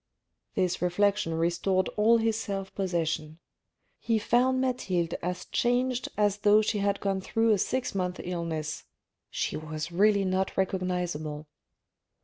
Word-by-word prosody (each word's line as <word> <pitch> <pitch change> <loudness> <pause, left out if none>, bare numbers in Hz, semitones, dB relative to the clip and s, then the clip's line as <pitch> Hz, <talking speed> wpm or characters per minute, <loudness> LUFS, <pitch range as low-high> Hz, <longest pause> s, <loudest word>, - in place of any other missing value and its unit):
This 185 -3 0
reflection 180 -1 +1
restored 175 +3 +1
all 220 +2 +4
his 225 -1 +1
self 195 -3 -4
possession. 165 -4 -2 0.6
He 230 -1 +1
found 250 +4 +2
Mathilde 185 -10 -1
as 180 0 -3
changed 245 +1 0
as 205 -1 +2
though 210 +1 +5
she 210 0 0
had 200 0 0
gone 195 -1 -1
through 225 +3 +1
a 205 - +3
six 260 +6 -1
months' 180 -2 -2
illness: 165 -4 -4 0.4
she - - -2
was 155 +1 -5
really 200 +2 +3
not 185 +1 -1
recognisable. 180 -5 -2
190 Hz, 130 wpm, -28 LUFS, 170-215 Hz, 0.6 s, though